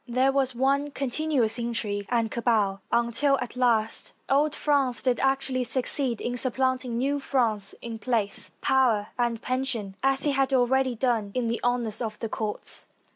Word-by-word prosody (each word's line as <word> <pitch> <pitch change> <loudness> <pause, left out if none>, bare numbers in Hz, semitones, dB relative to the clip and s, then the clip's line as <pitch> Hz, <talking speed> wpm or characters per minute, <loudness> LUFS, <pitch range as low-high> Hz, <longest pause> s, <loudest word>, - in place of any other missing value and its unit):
There 255 +3 +2
was 265 -2 0
one 275 +3 +1
continuous 275 -4 0
intrigue 215 -4 -2
and 230 -2 0
cabal 215 -5 +1
until, 235 +4 +2
at 250 -1 -5
last, 230 -3 +1
old 295 +2 +2
France 275 -5 +1
did 250 -3 +1
actually 270 -1 0
succeed 255 0 0
in 245 0 -3
supplanting 255 -1 -1
new 280 +3 0
France 225 -8 0
in 230 -1 -6
place, 220 -3 0
power, 235 -6 +2
and 235 -2 0
pension, 255 -6 -2
as 270 +1 +2
it 290 - +3
had 270 -1 +1
already 260 0 +2
done 230 -4 0
in 245 -2 0
the 235 - -2
honors 240 -3 0
of 220 -2 -3
the 225 - -4
courts. 215 -1 -2
245 Hz, 160 wpm, -26 LUFS, 230-265 Hz, -, it